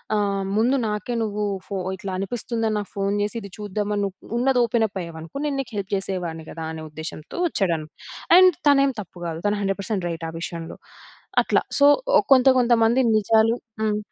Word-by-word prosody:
ఆహ్, 200 Hz, -2 st, 0 dB
ముందు 240 Hz, +5 st, +3 dB
నాకే 210 Hz, +3 st, -3 dB
నువ్వు 210 Hz, -1 st, -2 dB, 0.2 s
ఫో 200 Hz, -, -5 dB, 0.2 s
ఇట్లా 190 Hz, 0 st, -6 dB
అనిపిస్తుందని 225 Hz, +2 st, -2 dB
నాకు 205 Hz, -, -6 dB
ఫోన్ 200 Hz, 0 st, 0 dB
జేసి 210 Hz, +3 st, -2 dB, 0.2 s
చూద్దాం 210 Hz, 0 st, -3 dB
అని 205 Hz, -, 0 dB
నువ్వు 195 Hz, -1 st, -8 dB
ఉన్నది 255 Hz, +1 st, +2 dB
ఓపెన్ 230 Hz, -1 st, +2 dB
అప్ 195 Hz, -2 st, -6 dB
అయ్యావనుకో 165 Hz, +7 st, -7 dB
నేను 285 Hz, -2 st, -1 dB
నీకు 245 Hz, -3 st, -10 dB
హెల్ప్ 195 Hz, -1 st, -4 dB
చేసేవాడిని 180 Hz, -5 st, -4 dB
కదా!" 165 Hz, -1 st, -6 dB
అనే 160 Hz, 0 st, -7 dB
ఉద్దేశంతో 155 Hz, -, -8 dB
వచ్చాడు. 190 Hz, -, 0 dB, 0.6 s
అండ్ 370 Hz, -2 st, +7 dB
తనేం 275 Hz, -1 st, +4 dB
తప్పు 185 Hz, -2 st, -14 dB
కాదు, 165 Hz, 0 st, -5 dB
తను 205 Hz, 0 st, +1 dB
100% 195 Hz, -1 st, -2 dB
రైట్ 165 Hz, -1 st, -5 dB
ఆ -, -, -7 dB
విషయంలో. 165 Hz, -1 st, -6 dB, 0.7 s
అట్లా -, -, +2 dB, 0.2 s
సో, 280 Hz, -, +6 dB, 0.5 s
కొంత 260 Hz, 0 st, +5 dB
కొంత 245 Hz, -1 st, +3 dB
మంది 235 Hz, +4 st, +3 dB, 0.2 s
నిజాలు 220 Hz, +2 st, +3 dB, 0.3 s
హ్మ్. 215 Hz, -1 st, +1 dB
205 Hz, 175 wpm, -23 LUFS, 185-230 Hz, 0.7 s, అండ్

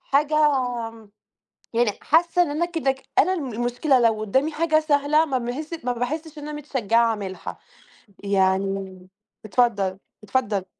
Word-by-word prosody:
حاجة 295 Hz, +2 st, +1 dB, 0.2 s
آمم، 230 Hz, -4 st, -4 dB, 0.6 s
يعني 235 Hz, -1 st, +2 dB
حاسّة 340 Hz, +2 st, +3 dB
إن 340 Hz, -, -1 dB
أنا 310 Hz, +4 st, 0 dB
كده 325 Hz, -6 st, 0 dB
ك 265 Hz, 0 st, -16 dB, 0.2 s
أنا 360 Hz, +6 st, +5 dB
المشكلة 250 Hz, -1 st, 0 dB
لو 225 Hz, -2 st, +2 dB
قدّامي 265 Hz, +9 st, 0 dB
حاجة 315 Hz, 0 st, +2 dB
سهلة 300 Hz, 0 st, +3 dB
ما 270 Hz, -5 st, -1 dB
باحس 295 Hz, +6 st, -5 dB
ما 250 Hz, -, 0 dB
باحسّش 300 Hz, +6 st, -4 dB
إن -, -, -8 dB
أنا -, -, -5 dB
متشجعة 250 Hz, -6 st, +1 dB
أعملها، 205 Hz, -4 st, -4 dB, 0.7 s
يعني 190 Hz, -1 st, 0 dB, 0.4 s
اتفضّل، 200 Hz, -3 st, +1 dB, 0.2 s
اتفضّل. 210 Hz, -3 st, -1 dB
250 Hz, 140 wpm, -23 LUFS, 215-300 Hz, 0.7 s, أنا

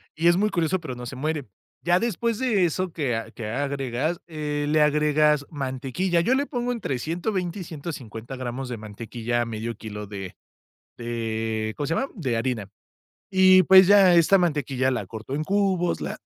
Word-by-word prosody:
Y 165 Hz, +2 st, +1 dB
es 175 Hz, +1 st, +5 dB
muy 210 Hz, +1 st, +1 dB
curioso, 170 Hz, +2 st, 0 dB
pero, 160 Hz, -7 st, -6 dB
no 125 Hz, 0 st, -7 dB
se 130 Hz, -, -7 dB
muere. 150 Hz, -1 st, -2 dB, 0.3 s
Ya 175 Hz, +1 st, +3 dB
después 230 Hz, 0 st, -1 dB
de 225 Hz, -8 st, +2 dB
eso 175 Hz, +1 st, -2 dB
que 135 Hz, -8 st, -1 dB
a 115 Hz, -, -5 dB
que 110 Hz, -3 st, -7 dB
agregas, 140 Hz, +4 st, -2 dB
eh, 150 Hz, -2 st, -3 dB
le 155 Hz, +1 st, +3 dB
agregas 150 Hz, 0 st, +3 dB
mantequilla. 140 Hz, +5 st, -1 dB
Yo 255 Hz, +9 st, +2 dB
le 280 Hz, -, +1 dB
pongo 245 Hz, -3 st, -2 dB
entre 165 Hz, -, -3 dB
120 175 Hz, -, -2 dB
y -, -, -4 dB
150 135 Hz, -7 st, -7 dB
gramos 130 Hz, +1 st, -5 dB
de 120 Hz, -, -4 dB
mantequilla 115 Hz, +3 st, -3 dB
a -, -, 0 dB
1/2 115 Hz, 0 st, -4 dB
kilo 105 Hz, -1 st, -7 dB
de 95 Hz, -2 st, -7 dB, 0.6 s
de, 110 Hz, -2 st, -3 dB
¿cómo 145 Hz, -, -3 dB
se 165 Hz, -, 0 dB
llama?, 270 Hz, -, 0 dB
de 130 Hz, -, -1 dB
harina. 115 Hz, -4 st, -2 dB, 0.6 s
Y, 185 Hz, -1 st, +6 dB
pues, 190 Hz, +1 st, +8 dB
ya 195 Hz, -3 st, +7 dB
esta 170 Hz, +4 st, +5 dB
mantequilla, 140 Hz, -7 st, 0 dB
la 125 Hz, -, -2 dB
corto 110 Hz, +3 st, -8 dB
en 150 Hz, +2 st, -1 dB
cubos, 190 Hz, -2 st, +1 dB
la -, -, -4 dB
150 Hz, 185 wpm, -25 LUFS, 120-175 Hz, 0.6 s, pues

